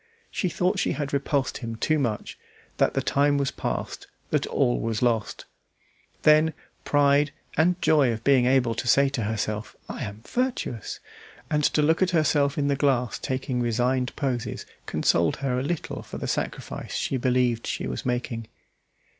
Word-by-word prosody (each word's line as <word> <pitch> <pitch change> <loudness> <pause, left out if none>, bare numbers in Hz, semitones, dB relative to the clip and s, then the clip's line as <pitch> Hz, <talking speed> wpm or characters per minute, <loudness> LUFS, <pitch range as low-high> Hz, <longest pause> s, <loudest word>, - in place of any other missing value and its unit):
She 185 - -1
thought 185 +3 0
she - - +1
had 145 -2 -4
repulsed 140 -1 0
him 115 -3 -5
too 155 +7 +1
much, 115 -6 -2 0.4
that - - +2
the - - +1
time 145 +1 +2
was 140 -1 0
past, - - -4 0.2
that - - +1
all - - +1
was 110 - -1
lost. 115 -3 0 0.8
Then, 155 +1 +5 0.3
pride, 145 0 +3 0.3
and 175 +3 +3
joy 145 -6 +4
of 110 0 -5
being 130 -3 +4
able 125 -3 +3
to 120 +2 -4
say 140 +2 +5
to 135 -3 -3
herself, 105 0 -3
"I - - -5
am 105 0 -7
virtuous," 245 - -2 0.5
and 150 -1 +2
to 150 - +2
look 160 +4 +3
at 185 - +4
herself 145 -1 +2
in 145 -1 +1
the 140 - +2
glass 130 -4 +1
taking 130 -1 -2
resigned 125 +2 0
poses, 130 -5 -2 0.2
consoled 85 -1 +2
her 135 -2 -1
a - - -1
little 150 +4 -3
for - - -8
the - - -4
sacrifice - - -4
she 135 - -1
believed 125 -2 +1
she - - -2
was - - -4
making. 120 -2 -2
135 Hz, 170 wpm, -26 LUFS, 120-145 Hz, 0.8 s, Then